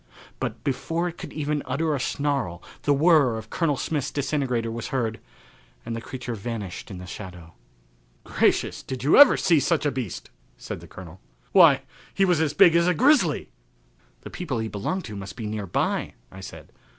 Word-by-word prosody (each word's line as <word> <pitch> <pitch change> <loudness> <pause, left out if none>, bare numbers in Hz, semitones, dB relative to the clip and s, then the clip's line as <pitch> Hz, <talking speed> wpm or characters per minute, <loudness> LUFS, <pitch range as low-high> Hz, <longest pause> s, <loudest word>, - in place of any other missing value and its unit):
But 115 +1 -4
before 165 +5 -1
it 170 - -12
could - - -8
even 150 -1 -2
utter 155 +5 0
a 140 - -1
snarl 135 -12 -2 0.2
the 145 - +1
whirr 145 -5 +4
of 110 0 -9
Colonel 155 -5 0
Smith's 145 -4 -2
disintegrator 135 -5 -1
was 115 0 -5
heard 115 -5 -2 0.7
and 115 0 -4
the 115 - -5
creature 125 0 -6
vanished 105 -3 -6
in 95 - -7
the 90 - -8
shadow. 90 -3 -9 0.7
"Gracious, - - +1
did 130 -1 -6
you 145 - +4
ever 285 -2 +9
see 165 -4 +3
such 150 +3 +1
a 145 - +2
beast?" 115 - -5 0.3
said - - -7
the - - -13
Colonel. 90 0 -12 0.3
"Why, - - +6 0.3
he 195 - +4
was 175 -4 +2
as 150 -2 0
big 175 -4 +6
as 170 +1 +4
a 180 - +2
grizzly." 245 - +3 0.7
"The - - -10
people 155 -9 -4
he 110 0 -2
belonged 110 - -3
to 105 - -7
must 100 -1 -7
be 115 - -6
near 105 -1 -4
by," - - -1 0.2
I 95 - -11
said. 95 - -10
130 Hz, 185 wpm, -25 LUFS, 110-155 Hz, 0.7 s, ever